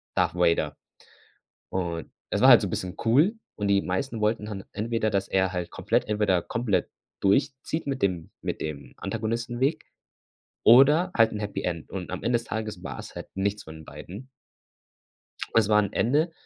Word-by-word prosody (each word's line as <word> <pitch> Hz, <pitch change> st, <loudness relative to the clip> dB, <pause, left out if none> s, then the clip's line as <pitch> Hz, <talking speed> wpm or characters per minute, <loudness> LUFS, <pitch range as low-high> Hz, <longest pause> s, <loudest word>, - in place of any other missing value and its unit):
Darth -, -, +1 dB
Vader. 85 Hz, -2 st, +2 dB, 1.0 s
Und, 85 Hz, -3 st, -3 dB, 0.2 s
es -, -, 0 dB
war -, -, +7 dB
halt -, -, +10 dB
so -, -, -1 dB
'n -, -, -5 dB
bisschen 90 Hz, +1 st, -4 dB
cool 150 Hz, -, +4 dB, 0.2 s
und 105 Hz, -1 st, -1 dB
die 100 Hz, 0 st, +3 dB
meisten 110 Hz, +5 st, -2 dB
wollten 105 Hz, 0 st, 0 dB
dann 100 Hz, -3 st, -6 dB
entweder, 110 Hz, +1 st, -1 dB
dass 100 Hz, -1 st, -1 dB
er 95 Hz, -1 st, +1 dB
halt 90 Hz, -1 st, -3 dB
komplett -, -, 0 dB
entweder 105 Hz, -5 st, +2 dB
komplett 115 Hz, -4 st, -1 dB, 0.3 s
durchzieht 130 Hz, +9 st, 0 dB
mit 135 Hz, -1 st, -3 dB
dem 90 Hz, -4 st, 0 dB
mit -, -, -3 dB
dem 70 Hz, -3 st, -6 dB
Antagonistenweg 120 Hz, +7 st, -2 dB, 0.8 s
oder 145 Hz, +10 st, +6 dB
halt 115 Hz, -1 st, +4 dB
'n 105 Hz, -, -4 dB
Happy 100 Hz, -2 st, -4 dB
End. 85 Hz, -3 st, -3 dB
Und 95 Hz, -2 st, -5 dB
am 95 Hz, -, -5 dB
Ende 120 Hz, 0 st, +2 dB
des 115 Hz, -, -8 dB
Tages 110 Hz, -4 st, -4 dB
war -, -, -6 dB
es -, -, -9 dB
halt -, -, -7 dB
nichts 100 Hz, +2 st, -1 dB
von 80 Hz, -, -10 dB
den 80 Hz, -, -12 dB
beiden. 90 Hz, -, -10 dB, 1.3 s
Es 115 Hz, -3 st, +5 dB
war 105 Hz, 0 st, +5 dB
'n 100 Hz, -, 0 dB
Ende. 150 Hz, +8 st, +2 dB
105 Hz, 180 wpm, -26 LUFS, 95-120 Hz, 1.3 s, halt